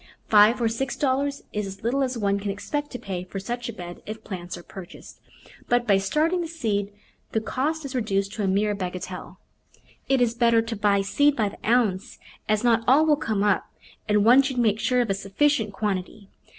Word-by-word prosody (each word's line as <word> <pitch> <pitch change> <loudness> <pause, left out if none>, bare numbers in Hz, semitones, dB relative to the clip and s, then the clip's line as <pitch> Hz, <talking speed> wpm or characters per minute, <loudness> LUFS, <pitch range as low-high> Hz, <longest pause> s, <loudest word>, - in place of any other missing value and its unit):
Five 215 +3 +6
or 235 - +2
six 265 +4 -2
dollars 280 +1 0
is 210 -1 -2
as 195 +1 -10
little 255 +5 +1
as 255 -2 -1
one 200 -2 0
can 200 0 -4
expect 290 +9 -3
to 250 - -6
pay 185 -6 -5
for 190 +2 -6
such 240 +4 -4
a - - -2
bed 175 -5 -9
if 220 +1 -7
plants 180 -3 -6
are 175 - -11
purchased, 185 -1 -11 0.5
but 245 0 +2
by 200 -4 +4
starting 310 - +1
the 335 - -3
seed 215 -11 -2 0.4
the 220 - +2
cost 285 +7 -2
is 275 - -6
reduced 200 -5 -1
to 215 - -3
a - - +1
mere 205 +2 +1
bagatelle. 185 -1 -6 0.7
It 270 -1 +3
is 240 -2 +2
better 235 -1 +3
to 225 0 -4
buy 200 -1 +2
seed 285 +8 +2
by 215 -5 +1
the - - -15
ounce, 225 -3 +1 0.3
as 215 +1 +2
not 230 -1 +3
all 280 +5 +6
will 305 -1 +4
come 215 -7 -1
up, 205 -2 +1 0.4
and 210 0 +3
one 250 +4 +8
should 270 -2 -3
make 220 -3 +2
sure 250 +1 +2
of 230 -4 -1
a - - +3
sufficient 210 +4 0
quantity. 200 0 -4
220 Hz, 210 wpm, -25 LUFS, 200-255 Hz, 0.7 s, one